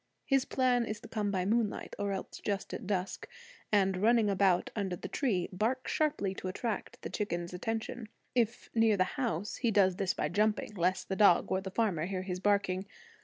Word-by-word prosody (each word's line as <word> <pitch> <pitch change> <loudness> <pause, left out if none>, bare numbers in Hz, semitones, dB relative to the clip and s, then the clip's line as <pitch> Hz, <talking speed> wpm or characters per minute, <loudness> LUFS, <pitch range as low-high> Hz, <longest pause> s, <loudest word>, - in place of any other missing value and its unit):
His 270 -2 +3
plan 250 -2 +2
is 215 -2 -4
to - - -10
come 210 -2 -1
by 185 -2 0
moonlight, 220 0 0
or 200 0 -1
else 195 - -5
just 200 -2 -2
at - - -5
dusk, 195 -2 -2 0.4
and, 195 -3 +3
running 220 +1 +4
about 190 -2 +2
under 195 -4 -1
the - - -7
tree, 205 -11 0
bark 230 +7 -1
sharply 290 -11 0
to 190 - -6
attract 230 +4 -3
the - - -4
chickens' 175 -4 -3
attention. 225 +4 -4 0.2
If 235 -1 0
near 225 -2 +4
the 185 - +4
house, 210 - -2
he 240 - +1
does 190 -4 +3
this 195 -2 0
by - - 0
jumping, 210 +4 +1
lest 185 0 0
the 190 - -2
dog 200 -3 +5
or 190 - +1
the 190 - -5
farmer 185 -6 0
hear 185 -1 -3
his 180 -1 -4
barking. 195 -1 +1
200 Hz, 195 wpm, -32 LUFS, 185-225 Hz, 0.4 s, dog